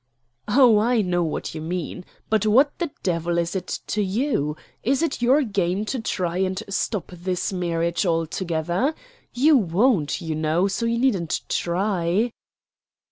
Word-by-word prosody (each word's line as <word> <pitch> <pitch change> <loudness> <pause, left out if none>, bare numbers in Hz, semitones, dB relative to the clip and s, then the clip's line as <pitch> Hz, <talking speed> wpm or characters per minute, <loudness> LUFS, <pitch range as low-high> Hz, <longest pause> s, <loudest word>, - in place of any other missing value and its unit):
"Oh, 235 -1 +6
I 230 0 +2
know 175 -1 +1
what 160 - -3
you 155 - -6
mean. 175 +2 -4 0.2
But 215 -1 +1
what 270 +7 +4
the 345 -3 -1
devil 170 -1 0
is 170 +2 -1
it 185 -2 -3 0.2
to 210 - -1
you? 195 - 0 0.2
Is 270 +7 +1
it 280 -6 -1
your 265 +5 +4
game 195 -3 -1
to 255 +4 -2
try 180 -5 -2
and 190 +2 -1
stop 200 0 -2
this 180 +2 -3
marriage 170 -1 0
altogether? 170 - -1 0.4
You 295 +5 +4
won't, 190 - +2
you 160 -1 -3
know, 155 +4 +1
so 200 +4 -1
you 230 0 0
needn't 205 -10 +1
try." 185 +4 0
190 Hz, 150 wpm, -23 LUFS, 170-230 Hz, 0.4 s, Oh